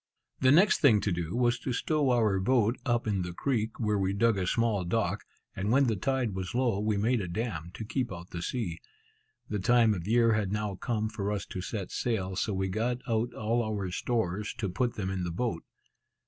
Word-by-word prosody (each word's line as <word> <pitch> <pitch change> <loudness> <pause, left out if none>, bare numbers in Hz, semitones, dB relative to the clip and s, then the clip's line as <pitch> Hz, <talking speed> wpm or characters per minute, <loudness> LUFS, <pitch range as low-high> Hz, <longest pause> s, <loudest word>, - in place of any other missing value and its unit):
The 130 0 +5
next 190 +8 +5
thing 120 -8 +6
to 100 - 0
do 85 +2 -2
was 120 0 +2
to 130 - -3
stow 145 +3 +1
our 110 -6 +3
boat 115 +3 +2
up 120 -1 +1
in 100 -3 0
the 90 0 -4
creek, 115 +1 -1
where 105 -2 +1
we 95 0 0
dug 115 +2 +3
a 95 -2 -1
small 115 -4 +1
dock; 100 +1 -1 0.3
and 100 +3 -1
when 135 +3 +5
the 115 -3 +1
tide 125 +1 -1
was 95 +3 -4
low, 120 -5 +1
we 105 0 0
made 115 +3 +1
a 95 - -4
dam, 85 -4 -3
to 110 - -6
keep 120 +1 -2
out 85 -1 -8
the 85 - -5
sea. 85 -4 -3 0.7
The 105 - -2
time 115 +2 +4
of 90 -2 -5
year 115 0 +4
had 105 -3 0
now 105 -1 -1
come 110 +3 -2
for 105 -2 -3
us 100 -2 -2
to 90 - -6
set 100 -1 -5
sail, 95 -6 -1
so 105 - -1
we 95 -1 -1
got 115 +6 -1
out 115 +1 0
all 115 +2 0
our 105 -4 -3
stores, 105 -1 -1
to 105 -4 -2
put 120 +7 -1
them 95 -2 -2
in 95 -1 -2
the 85 - -2
boat. 85 -1 -2
105 Hz, 220 wpm, -29 LUFS, 95-120 Hz, 0.7 s, thing